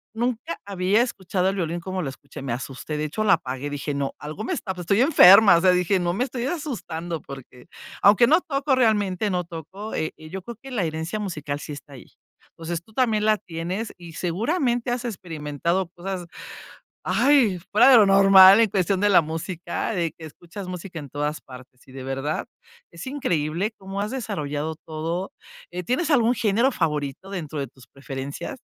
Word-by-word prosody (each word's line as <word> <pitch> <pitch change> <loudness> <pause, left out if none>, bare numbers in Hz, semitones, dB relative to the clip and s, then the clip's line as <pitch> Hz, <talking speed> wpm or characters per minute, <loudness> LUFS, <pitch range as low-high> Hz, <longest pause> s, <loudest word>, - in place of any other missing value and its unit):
Nunca 230 -8 -2
había 200 +3 +1
escuchado 190 -5 -1
el 195 - 0
violín 170 -2 -2
como 185 +1 -4
lo 140 - -3
escuché, 135 +1 -11
me 135 -3 -4
asusté. 135 +4 -5
De 150 - -1
hecho, 215 +9 -2
la 200 -3 +5
apagué, 130 +2 -2
dije 145 0 -4
no, 140 -1 -2
algo 155 +8 -6
me 250 - -4
está 205 - -3
pues, 180 -1 -7
estoy 200 +6 +2
enferma, 205 - +8
o 170 - +3
sea, 185 -1 +5
dije: 180 +1 +2
"No, 175 0 0
me 245 +7 0
estoy 250 -2 -4
asustando", 175 - -4
porque, 130 0 -12 0.3
aunque 210 +4 +6
no 320 +5 +5
toco 275 -3 0
realmente, 210 -5 +1
no 180 -2 -1
toco, 180 +6 -8
eh, 155 - -2
yo 160 +5 -8
creo 235 +4 -9
que 270 - -10
la 215 -7 -1
herencia 160 +5 -3
musical 150 -8 -4
sí - - -7
está 140 0 -10
ahí. 130 - -13 0.4
Entonces, 165 0 -5
tú 220 - -22
también 220 -3 +1
la 215 -1 +3
tienes 180 +6 -5
y 170 -2 -11
seguramente 240 - -1
has 245 0 -2
experimentado 170 - -2
cosas, 180 +1 -6 0.8
ay, 255 -10 +3
fuera 220 +6 +6
de 255 - +9
lo 210 - +7
normal 195 +1 +8
en 225 - +3
cuestión 190 0 0
de 205 - +3
la 185 - +6
música, 165 +5 -4
de 170 -6 -1
que 160 - -11
escuchas 175 +5 -10
música 180 -1 -7
en 140 -3 -9
todas 150 +2 -3
partes, 125 -1 -14
y - - -15
de 130 0 -8
verdad 135 +3 -3 0.5
es 170 +6 -9
increíble 180 - -1
cómo 195 +1 -6
has 210 +3 -2
desarrollado 160 - -3
todo, 165 +4 -4 0.4
eh, 180 0 -5
¿tienes 275 - -1
algún 240 -3 +4
género 230 +4 +2
favorito 150 - -2
dentro 160 -6 -5
de 135 - -3
tus 130 +1 -19
preferencias? 135 - -7
180 Hz, 190 wpm, -24 LUFS, 155-215 Hz, 0.8 s, de